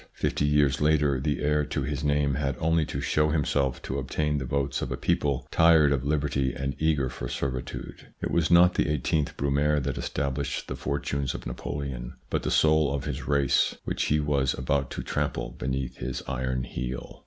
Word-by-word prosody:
Fifty 75 - 0
years 75 -1 +3
later 75 -3 +3
the 75 +2 -1
heir 75 +1 +2
to 75 -1 -2
his 70 +2 -3
name 70 -1 +2
had 70 -1 -1
only 80 -1 +2
to 70 - -4
show 75 +2 +2
himself 70 -4 0
to 70 - -3
obtain 75 +2 -1
the 65 - -4
votes 70 +2 -1
of - - -3
a - - -2
people 70 -3 0
tired 80 -3 +5
of 70 -2 +1
liberty 70 -2 0
and 70 +1 -2
eager 75 -4 +2
for - - -5
servitude. 65 -2 -5
It - - -3
was 85 -3 +2
not 90 +1 +6
the - - +1
i8th 75 0 0
Brumaire 70 +2 +2
that 65 -2 -3
established 70 +3 -2
the - - -4
fortunes 70 -2 -2
of - - -7
Napoleon, 60 0 -5 0.2
but - - 0
the - - -2
soul 75 -2 +4
of 70 - -3
his - - -4
race 70 -2 +2
which - - -1
he 75 - +2
was 70 -3 +1
about 70 +1 0
to - - -5
trample - - -2
beneath 65 -1 -3
his 65 +1 -4
iron 65 -1 -1
heel. 65 -1 -5
70 Hz, 190 wpm, -27 LUFS, 65-75 Hz, 0.2 s, not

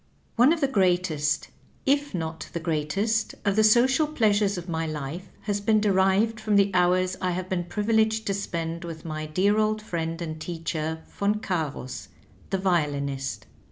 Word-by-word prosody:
One 250 +5 +6
of 330 -1 0
the 275 - +3
greatest, 175 - +1 0.4
if 285 -3 +1
not 160 -1 -4
the 170 - -2
greatest, 170 +8 -1
of 200 -1 +2
the 215 - +4
so 235 +3 +6
cial 300 +4 +1
pleasures 205 -4 +2
of 175 0 -6
my 165 -1 -2
life 155 +5 -5
has 205 -1 -2
been 215 +1 +3
derived 200 +2 +2
from 215 -1 0
the 200 0 +4
hours 180 +1 +3
I 185 - +1
have 180 +1 -3
been 175 -2 -1
privileged 220 +3 +1
to 200 - 0
spend 170 -4 -3
with 165 -2 -8
my 155 -1 -4
dear 195 +7 +2
old 215 0 +1
friend 165 -5 -3
and 160 -2 -5
teacher. 160 -1 -3 0.2
Yon 205 +1 +3
Cams, 155 -10 -3 0.4
the 195 - 0
violinist. 145 -7 -1
185 Hz, 170 wpm, -26 LUFS, 160-215 Hz, 0.4 s, One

